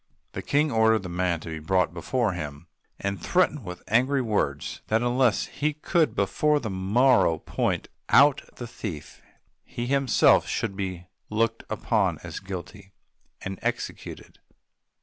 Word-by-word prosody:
The - - -5
King 150 +1 +1
ordered 110 -2 +3
the 90 - -6
man 85 -1 -1
to 85 - -8
be 80 -1 -5
brought 85 +2 +1
before 110 +6 -1
him, 75 -3 -6 0.3
and 100 -3 -3
threatened 175 - +1
with 90 -2 -8
angry 130 +5 +2
words 75 - -2
that 110 +2 +1
unless 120 -2 +2
he 150 +2 -2
could 160 +2 +1
before 150 -1 +2
the 110 -6 -4
morrow 100 -1 +3
point - - -2 0.2
out 140 +1 +6
the 120 - -6
thief, 85 -10 -7 0.4
he 120 - -5
himself 135 -1 +4
should 95 - -2
be 95 -3 -4 0.2
looked 115 +1 0
upon - - 0
as - - -6
guilty 95 +1 -8 0.5
and 95 -1 -5
executed. - - -5
110 Hz, 145 wpm, -26 LUFS, 90-130 Hz, 0.5 s, out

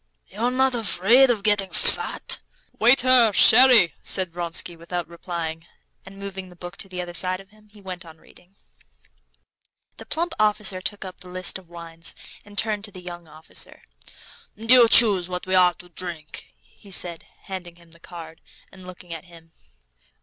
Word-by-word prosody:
"You're 225 +5 -2
not 260 +1 +1
afraid 235 +3 +3
of 220 -5 0
getting 205 -2 +1
fat?" - - +2 0.4
"Waiter, 245 -1 +5
sherry!" 240 -5 +6
said 185 -3 -1
Vronsky, 170 0 -3
without 170 +1 -5
replying, 170 -1 -6 0.4
and 195 +1 -11
moving 195 -1 -8
the 180 - -16
book 175 +1 -10
to 195 - -3
the 180 -1 -5
other 175 0 -9
side 185 +1 0
of 195 0 -15
him, 215 0 -24
he 205 0 -18
went 185 -2 -8
on 160 -2 -14
reading. 180 +4 -22 1.4
The - - -12
plump 335 +1 -2
officer 210 -3 +2
took 205 +1 -5
up 185 -1 -10
the 180 - -7
list 185 +1 -1
of 180 -3 -21
wines 165 -1 -6 0.3
and 205 0 -17
turned 210 0 0
to 205 - -8
the 185 - -12
young 175 -1 -9
officer. 155 +1 -10 0.7
"You 230 +2 +5
choose 200 -7 +7
what 180 0 -5
we're 185 -1 +3
to 175 +2 -16
drink," 170 - -9
he 60 - -20
said, 175 -3 -1 0.2
handing 180 -3 -8
him 170 -1 -21
the 170 - -13
card, 165 -2 -11 0.3
and 185 -1 -14
looking 180 -1 -10
at 165 - -8
him. 165 -2 -17
185 Hz, 170 wpm, -23 LUFS, 175-210 Hz, 1.4 s, choose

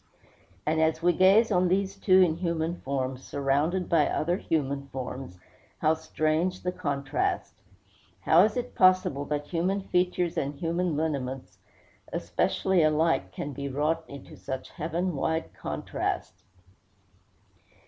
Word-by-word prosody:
And 160 +1 +1
as 160 +1 +1
we 175 0 +4
gaze 195 +6 +5
on 180 -1 +3
these 195 +2 0
two 190 -1 +4
in 165 -3 +1
human 170 -1 -2
form, 130 -1 -2
surrounded 145 +7 0
by 155 -4 +3
other 175 +4 0
human 140 -6 -2
forms, 130 -6 -6 0.4
how 155 - +3
strange 160 +3 -1
the 180 - 0
contrast! 140 -5 -2 0.7
How 165 - +5
is 215 +3 +1
it 245 - -3
possible 185 -6 +3
that 145 0 -2
human 185 +4 0
features 180 -1 +1
and 140 +1 -3
human 170 +1 -1
lineaments 130 - -3 0.5
essentially 190 -2 +1
alike 155 - +2
can 140 +8 -5
be 140 +1 -4
wrought 155 +4 0
into 140 -1 -11
such 130 -1 -6
heaven 170 +2 -2
wide 160 +3 -1
contrast? - - -3
160 Hz, 130 wpm, -27 LUFS, 140-180 Hz, 0.7 s, gaze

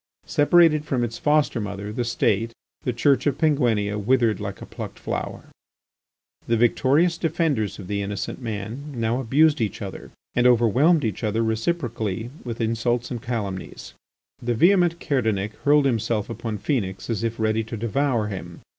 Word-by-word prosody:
Separated 155 0 +4
from 130 -5 -1
its 115 -1 -4
foster 150 -5 +2
mother, 100 +1 -5
the 120 - -1
State, 115 -1 0 0.3
the 125 - -1
Church 135 +5 +2
of 145 - +1
Penguinia 115 -10 +1
withered 115 0 +2
like 100 -2 -5
a - - -8
plucked - - -8
flower. - - -4 1.0
The 115 - +2
victorious 140 +8 +3
defenders 155 - 0
of 100 - -8
the 100 +2 -2
innocent 100 +5 -4
man 115 +6 -5
now 115 +1 0
abused 145 +3 +3
each 110 - -2
other 95 -2 -7 0.2
and 120 0 +4
overwhelmed 125 - +4
each 110 -1 -3
other 110 +1 +1
reciprocally 115 - -2
with 120 -2 -5
insults 115 +2 0
and 120 -2 -4
calumnies. 105 -6 -5 0.5
The 120 0 -1
vehement 175 - +4
Kerdanic 110 - 0
hurled 145 0 +5
himself 115 -3 0
upon 115 -2 -4
Phœnix 100 -5 -2
as 115 -2 -2
if 115 0 -2
ready 110 0 +1
to 115 +1 -6
devour 115 +1 0
him. 90 -3 -7
115 Hz, 155 wpm, -24 LUFS, 110-140 Hz, 1.0 s, hurled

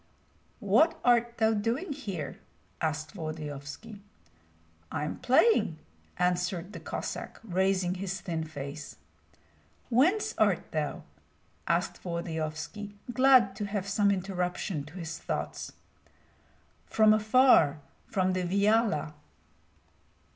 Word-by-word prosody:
"What 330 +1 +3
art 240 -1 +3
thou 220 0 +3
doing 235 - -1
here?" 200 - -5 0.4
asked 155 -1 -2
Volodyovski. 155 +4 -7 0.9
"I - - -2
am 150 - -4
playing," 255 - +3 0.4
answered 180 +1 0
the - - -7
Cossack, - - -5
raising 190 -2 +1
his 190 +1 -4
thin 165 -2 -3
face, 145 -1 -7 1.0
"Whence 335 - +3
art - - +2
thou?" - - -2 0.6
asked - - 0
Volodyovski, 170 +3 -4 0.2
glad 255 -7 +5
to 205 - -2
have 200 -1 -3
some 200 +1 +2
interruption 180 -4 -2
to 150 +4 -13
his 165 -3 -6
thoughts. - - -4 1.2
"From 215 -1 +5
afar, 215 - +5 0.3
from 185 -1 +1
the 185 - 0
Viahla." 200 -3 +2
190 Hz, 105 wpm, -29 LUFS, 160-220 Hz, 1.2 s, glad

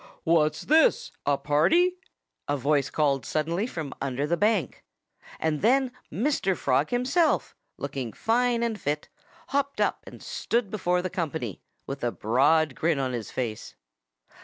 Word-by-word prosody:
"What's 155 -2 +2
this 315 +2 +3 0.2
a 145 -1 +3
party?" 315 - +3 0.5
a 145 - 0
voice 140 0 +1
called 140 -4 +1
suddenly 165 - -1
from 155 - -5
under 135 +1 -1
the 170 +3 +1
bank. 205 - 0 0.6
And 155 -2 0
then 260 +3 +3 0.2
Mr. 195 - 0
Frog 135 +2 +1
himself, 260 +7 +1 0.2
looking 130 -4 -4
fine 235 - +1
and 225 -3 -2
fit, 150 +1 -2 0.4
hopped 280 0 -1
up - - 0
and - - -10
stood 230 -4 -1
before 180 -4 0
the 185 - -3
company, 155 - -3 0.2
with 135 - -6
a 120 - +1
broad 140 +8 +2
grin 160 +2 +1
on 130 -2 -1
his 115 -4 -4
face. 115 -4 -4
160 Hz, 145 wpm, -26 LUFS, 140-230 Hz, 0.6 s, this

